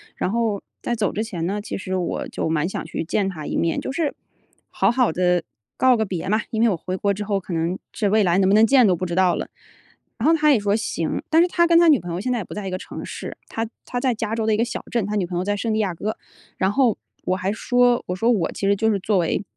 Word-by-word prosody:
然 - - -1
后 225 -3 0 0.2
在 240 - -2
走 215 -3 0
之 215 - -1
前 175 -7 -4
呢， 205 +3 -2
其 - - -5
实 185 -1 -4
我 180 -2 -2
就 - - -3
蛮 160 +1 +1
想 - - -4
去 160 - -4
见 195 +4 0
他 155 -5 -7
一 - - -3
面， 165 -1 +1
就 - - -4
是 300 +1 -1 0.6
好 195 +3 +2
好 250 -6 +2
地 180 0 +1 0.3
告 260 -1 +5
个 220 - +1
别 180 -4 -4
嘛！ 215 +2 +2
因 225 -1 0
为 235 - +5
我 195 - +1
回 185 +3 -4
国 200 +1 +1
之 205 +2 -4
后 200 -1 0
可 185 -1 -7
能 165 +3 -1
是 205 -3 0
未 215 0 +4
来 175 0 +2
能 190 -1 +3
不 - - +4
能 220 +2 +6
见 260 -3 +6
都 185 -3 +4
不 185 - -3
知 170 - -3
道 185 -1 +3
了。 - - -4 0.7
然 245 - +1
后 330 - +5
他 300 -1 +4
也 255 - +4
说 205 0 +1
行， 170 -7 -2
但 320 - +6
是 350 - +4
他 340 -1 +3
跟 335 0 +5
他 340 - +5
女 295 -5 +6
朋 175 -1 -6
友 175 - -2
现 255 - -1
在 245 - +1
也 205 - -3
不 - - -10
在 205 -2 -5
一 - - -4
个 185 - -2
城 - - -8
市， - - -7
他 225 0 -3 0.2
他 245 - -3
在 255 -1 +1
加 225 0 -3
州 225 -1 -1
的 220 - +2
一 210 - +2
个 230 - +2
小 240 - -4
镇， 235 -2 +1
他 210 - -2
女 200 -3 +1
朋 175 0 -6
友 180 - -1
在 205 +1 0
圣 225 +1 -1
地 220 - 0
亚 190 -5 0
哥。 215 +6 -3 0.4
然 190 +1 +1
后 245 -3 +3 0.3
我 185 - +1
还 190 0 -1
说 245 +2 +2
我 180 - -2
说 225 +6 +1
我 205 -8 +1
其 195 - -2
实 200 - +4
就 220 +2 +2
是 200 - 0
作 205 +1 +1
为 175 +3 0
205 Hz, 320 characters per minute, -22 LUFS, 185-230 Hz, 0.7 s, 能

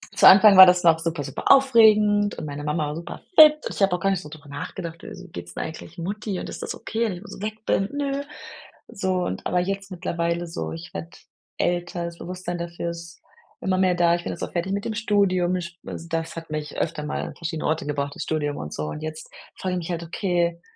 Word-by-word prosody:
Zu - - +4
Anfang 200 +1 +9
war 190 - +13
das 180 -1 +4
noch 160 -1 +6
super, 165 -3 -2
super - - 0
aufregend 215 -6 +5
und - - -5
meine 145 0 -6
Mama 150 0 -1
war 150 - -4
super 170 +1 -8 0.2
fit 305 -1 +10
und - - -4
ich - - -6
habe 195 -2 +4
auch - - -4
gar 195 - +1
nicht 190 -2 -1
so 150 - -10
drüber 155 -1 -12
nachgedacht: 170 +3 -6
„Wieso 185 0 -9
geht 85 - -8
es 85 - -11
denn - - -3
eigentlich 160 +3 -9
Mutti 200 +2 -4
und - - -6
ist - - -7
das - - -4
okay, 230 +1 -2
wenn 205 - -1
ich 175 - -8
so 200 -1 -10
weg 215 +1 -5
bin?“ 195 +1 +1
Ne. 280 0 -2 0.6
So 190 -1 -2
und - - -4
aber 180 - +1
jetzt 195 +1 -3
mittlerweile 170 -1 -2
so, 165 - -5
ich 165 0 -8
werde 165 - -6 0.5
älter, 175 0 -1
das 170 0 -7
Bewusstsein 180 0 -5
dafür 170 0 -4
ist 170 0 -10 0.4
immer 185 0 0
mehr 185 -1 +3
da. 170 -1 +4
Ich 175 - -5
bin - - -3
jetzt - - -6
auch - - -4
fertig 180 +2 -1
mit 200 +1 -2
dem 225 - -2
Studium. 185 -4 +1
Sch 170 0 -8
d - - -6
das 165 0 -3
hat 165 -1 -8
mich 150 -1 -5
öfter 155 -2 -2
mal 150 - -3
an - - -6
verschiedene 165 -2 -3
Orte 155 0 -1
gebracht, 145 -1 -3
das - - -4
Studium 150 -2 -1
und 75 - -6
so. 75 - -3
Und 150 - -6
jetzt 155 0 -6 0.3
frage 185 -1 -2
ich 180 - -1
mich 170 +1 -5
halt: 170 0 -3
„Okay, 170 -1 -1
175 Hz, 245 wpm, -24 LUFS, 165-195 Hz, 0.6 s, war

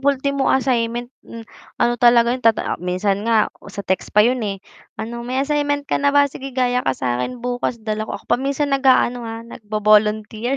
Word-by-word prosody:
ultimo 280 0 0
assignment, 240 -2 0 0.2
m 230 0 -9 0.3
ano 240 - +2
talaga 240 -1 +5
yun 255 - -3
tata 225 -7 +1
minsan 185 +3 -1
nga 225 -2 +2 0.2
sa 200 0 -7
text 190 0 -1
pa 210 - +7
yun, 250 +2 +1
eh, 205 -3 -3 0.4
"Ano 235 +2 -5
may 245 +2 -4
assignment 290 -1 0
ka - - -1
na 285 - +3
ba? 285 0 +5
Sige 270 -1 -7
gaya 250 -1 +2
ka 135 - -1
sakin 125 - -3
bukas" 245 0 -2
dala 215 0 -3
ko - - -4
ako - - -16
pa - - +2
minsan 280 +1 -1
nag-aano, 260 -2 +3
ah, 225 0 -7
nga 235 - -11
nag-vo-volunteer 215 +3 +1
240 Hz, 195 wpm, -20 LUFS, 215-265 Hz, 0.4 s, pa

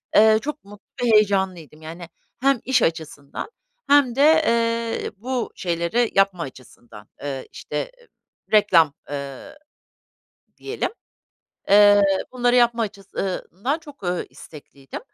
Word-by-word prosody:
eee, 220 0 +6
çok 300 +1 -6
mutlu 205 0 -15 0.2
ve 230 - +3
heyecanlıydım. 190 -7 +1
Yani 165 +2 -9 0.3
hem 275 -2 +3
iş 265 0 +2
açısından 160 - -3 0.4
hem 280 -4 +4
de, 275 - +1 0.3
eee, 230 0 0
bu 250 +2 -3
şeyleri 175 +7 -1
yapma 195 -3 +2
açısından, 120 -5 -13
eee, 135 -2 -5
işte, - - -5 0.6
reklam, 175 -8 +5 0.2
eee, 140 - -7 1.0
diyelim. - - -3 0.8
Eee, 205 0 +7 0.3
bunları 245 -1 +2
yapma 235 -1 +3
açıs 200 -2 -7
ııı 190 -2 -3
ından, 230 - -1
eee, 325 - -17
çok 290 -6 -15 0.3
istekliydim 140 -3 -11
205 Hz, 120 wpm, -22 LUFS, 165-240 Hz, 1.0 s, Eee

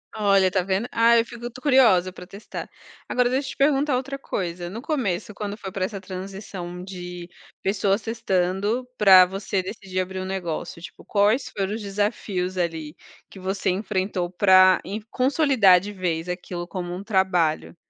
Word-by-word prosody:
Olha, 200 -3 +4
está 185 0 +1
vendo? 195 +5 -1
Ah, 230 0 +5
eu 230 - +1
fico 240 0 -8
curiosa 230 -10 +4
para 180 -1 -11
testar. 200 +3 -8 0.4
Agora 250 -1 +2
deixa 265 +2 -1
eu - - -4
te - - -12
perguntar 280 0 +3
outra 270 +2 -3
coisa, 175 -9 -4
no 210 +6 -7
começo 215 - -2
quando 205 -1 -4
foi 195 -3 -8
para 185 0 -1
essa 195 -1 -6
transição 185 -1 -7
de 180 -2 -8 0.3
pessoas 195 +1 +1
testando, 210 +1 -1
para 190 -3 +8
você 195 +1 -2
decidir 190 -1 -5
abrir 185 0 -3
um 185 - -4
negócio, 175 -3 -4
tipo, 175 - -11
quais 210 +5 +2
foram 195 +1 -1
os 225 - -6
desafios 195 -2 -2
ali 160 -3 -3 0.3
que 195 - -12
você 190 +1 -2
enfrentou 185 -2 -2
pra 185 0 +6
em 200 +3 -5
consolidar 255 - +4
de 205 +3 -7
vez 175 -3 -2
aquilo 180 -1 -5
como 175 0 -5
um 190 - -7
trabalho? 190 -7 +1
195 Hz, 170 wpm, -24 LUFS, 180-215 Hz, 0.4 s, para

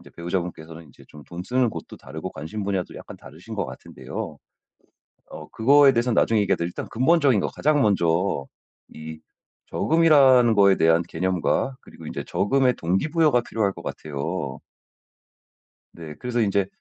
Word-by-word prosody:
이제 - - -16
배우자분께서는 85 -2 -5
이제 65 - -18
좀 75 - -14
돈 85 +1 -8
쓰는 125 +1 +1
곳도 - - -9
다르고 80 +7 -8
관심 90 +8 -6
분야도 95 -2 -3
약간 - - -10
다르신 80 +12 -11
것 100 - -2
같은데요. - - -8 0.9
어 - - -10
그거에 140 +4 +5
대해서는 120 0 0
나중에 110 -1 +3
얘기하더라도 85 -3 0
일단 90 - -7
근본적인 135 - +3
거 - - -1
가장 150 0 +1
먼저 85 -6 +1 0.5
이 80 0 -9 0.5
저금이라는 140 -7 +4
거에 100 -2 +5
대한 80 +1 +3
개념과 95 +10 -1
그리고 - - -14
이제 - - -5
저금의 125 +5 +1
동기부여가 145 - +1
필요할 105 -4 -1
것 - - -11
같아요. 70 -1 -5 1.3
네. 80 -3 -10
그래서 125 -1 -2
인제 100 -2 +1
100 Hz, 365 characters per minute, -23 LUFS, 85-125 Hz, 1.3 s, 그거에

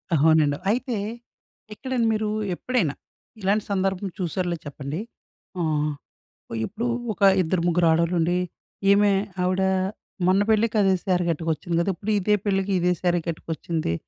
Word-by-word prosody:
అవునండి. 150 -1 +4
అయితే, 245 -1 -1 0.8
ఎక్కడండి 250 0 -1
మీరు 215 0 -1 0.3
ఎప్పుడైనా 210 - 0 0.5
ఇలాంటి 200 +2 +1
సందర్భం 195 0 0
చూసారులేదో 175 -1 -2
చెప్పండి. 145 +3 -5 0.6
ఆహ్, 150 -2 0 0.7
ఇప్పుడు 225 +5 -3 0.3
ఒక 200 - -21 0.2
ఇద్దరు 175 0 0
ముగ్గురు 175 -1 +3
ఆడవాళ్ళు 170 +2 +2
ఉండి. 175 +2 +2 0.5
"ఏమె 205 0 +5 0.3
ఆవిడ 185 +1 +1 0.7
మొన్న 190 +2 +4
పెళ్ళికి 220 +1 +2
అదే 195 -1 +4
శారి 180 -3 +1
కట్టుకొచ్చింది 165 +1 -1
కదా. 170 - +1
ఇప్పుడు 215 +3 -3
ఇదే 210 +2 +3
పెళ్ళికి 195 0 0
ఇదే 180 +1 +2
శారీ 175 -1 +2
కట్టుకొచ్చింది. 160 - -3
180 Hz, 130 wpm, -24 LUFS, 165-205 Hz, 0.8 s, ఏమె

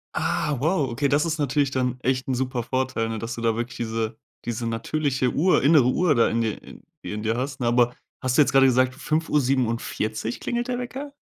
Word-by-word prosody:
Ah, 155 -4 0
wow, 155 -1 +1
okay, 130 +5 0
das 145 +3 +2
ist 160 -1 -1
natürlich 145 -1 +1
dann 125 -1 -1
echt 130 0 0
'n 130 - 0
super 125 -1 -2
Vorteil, 130 -2 -1
ne, 110 -1 -3
dass 115 +1 -5
du 115 - -6
da 115 -1 +1
wirklich 120 +1 -4
diese 110 -1 -3 0.3
diese 120 0 -3
natürliche 130 +2 -1
Uhr 175 +1 +3
innere 145 -2 +6
Uhr 165 +2 +2
da 115 - +4
in 115 - 0
dir 110 -2 -2 0.4
in 105 0 -5
dir 110 +1 0
hast, 135 +2 -3
ne? 120 - 0
Aber, 120 0 +3 0.3
hast 130 -1 0
du - - +7
jetzt 145 - +3
grade 135 0 +6
gesagt, 130 0 +3
5:47 130 -7 -1
klingelt 240 0 -2
der 250 -1 -2
Wecker? 265 +3 -6
130 Hz, 210 wpm, -24 LUFS, 115-145 Hz, 0.4 s, du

